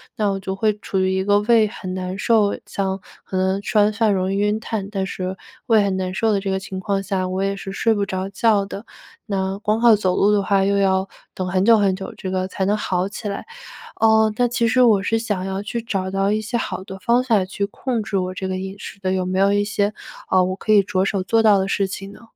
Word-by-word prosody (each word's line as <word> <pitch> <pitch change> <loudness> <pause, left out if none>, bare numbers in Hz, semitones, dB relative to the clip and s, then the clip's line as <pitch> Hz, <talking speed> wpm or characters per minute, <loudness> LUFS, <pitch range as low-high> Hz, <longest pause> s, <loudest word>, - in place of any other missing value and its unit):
那 210 -4 +1
我 195 - -3
就 190 0 -4
会 215 +1 +1
处 190 - -2
于 185 0 +1
一 190 - 0
个 205 +1 +3
胃 220 0 +4
很 185 -4 -7
难 185 +1 -4
受， 215 -2 +2
像 195 -1 -2 0.2
可 185 - -4
能 190 +1 +1
吃 215 - -2
完 210 0 +4
饭 215 0 +2
容 190 0 0
易 - - -1
晕 210 +1 +1
碳， 215 -3 -4
但 195 -2 -1
是 185 0 -4 0.3
胃 220 -3 +5
很 195 -1 0
难 185 -1 -2
受 220 +3 +1
的 200 - +2
这 195 - -3
个 190 - 0
情 190 0 -6
况 195 0 -1
下， 190 -1 -1
我 185 +1 -2
也 195 0 0
是 195 0 -7
睡 225 +3 +1
不 205 - 0
着 190 -1 -3
觉 205 -1 +2
的， 200 +2 -7 0.4
那 195 -1 -2
光 215 +1 0
靠 235 -2 +6
走 185 -3 0
路 205 +1 +3
的 205 - +3
话 195 0 +2
又 200 0 +2
要 190 0 +2 0.3
等 185 -1 -3
很 185 +1 +1
久 230 +2 +6
很 195 -3 +2
久 190 - -7
这 185 -2 -5
个 185 0 -1
才 190 0 -2
能 205 +2 +2
好 185 -3 -1
起 210 +2 -7
来。 200 - -4 0.6
呃， 220 -1 +4
那 245 0 +3
其 235 -1 0
实 255 +3 +3
我 215 -5 +5
是 225 +2 +1
想 205 -5 -2
要 190 +1 -3
去 235 +3 -4
找 190 -4 -2
到 195 +1 0
一 215 - 0
些 235 +3 -2
好 190 - -4
的 190 0 -8
方 235 +5 +2
法， 215 -7 +2
去 200 +1 -3
控 240 +2 -3
制 200 -1 -2
我 185 0 -2
这 190 0 -4
个 185 0 -2
饮 190 +1 -5
食 200 - -9
的， 185 -1 -1
有 185 -1 0
没 185 +1 -1
有 200 +1 +4
一 205 0 +2
些， 205 0 0 0.4
呃， 185 -1 +5
我 185 +1 -1
可 215 - -2
以 205 -1 +7
着 190 -1 0
手 195 -1 -1
做 225 +4 +2
到 205 -3 +5
的 190 - -1
事 195 0 +1
情 195 +1 -7
呢？ - - -15
195 Hz, 285 characters per minute, -21 LUFS, 190-215 Hz, 0.6 s, 以